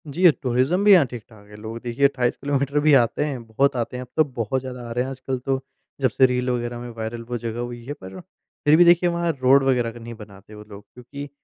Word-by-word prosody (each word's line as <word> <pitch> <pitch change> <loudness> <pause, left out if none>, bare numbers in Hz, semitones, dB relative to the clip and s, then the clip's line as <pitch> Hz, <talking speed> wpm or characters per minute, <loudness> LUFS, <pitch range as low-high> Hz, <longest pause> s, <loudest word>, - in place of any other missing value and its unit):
जी, 175 +5 +4
tourism 130 +8 0
भी 205 - +6
यहाँ 175 -6 +6
ठीक-ठाक 110 -4 -12
है, 105 - -14
लोग 110 +2 -7
देखिए 125 +3 0
28 125 -3 +1
किलोमीटर 140 +1 -1
भी 150 0 +4
आते 115 +5 -1
हैं, 135 -5 -5
बहुत 135 +5 +1
आते 120 +1 -3
हैं, - - -5
अब - - -14
तो 155 - +6
बहुत 130 -2 -3
ज़्यादा 125 -2 -8
आ - - -7
रहे 120 +2 0
हैं 130 - -5
आजकल 130 0 -4
तो 135 +1 -1 0.4
जब 130 - +3
से 130 +4 +4
रील 125 0 0
वग़ैरह 120 -1 -3
में 120 0 -7
वायरल 115 +1 -5
वो 120 - -2
जगह 115 0 -5
हुई 120 -1 -6
है। 145 - -5
पर 95 -7 -11 0.5
फिर 150 +1 +6
भी 175 - +7
देखिए 175 +1 +5
वहाँ 170 0 0
रोड 135 +2 +5
वग़ैरह 125 -3 +1
का 120 - -12
नहीं 115 0 -8
बनाते 105 -2 -14
वो 105 - -11
लोग 100 0 -11
क्योंकि 140 +4 -9
125 Hz, 250 wpm, -23 LUFS, 115-140 Hz, 0.5 s, भी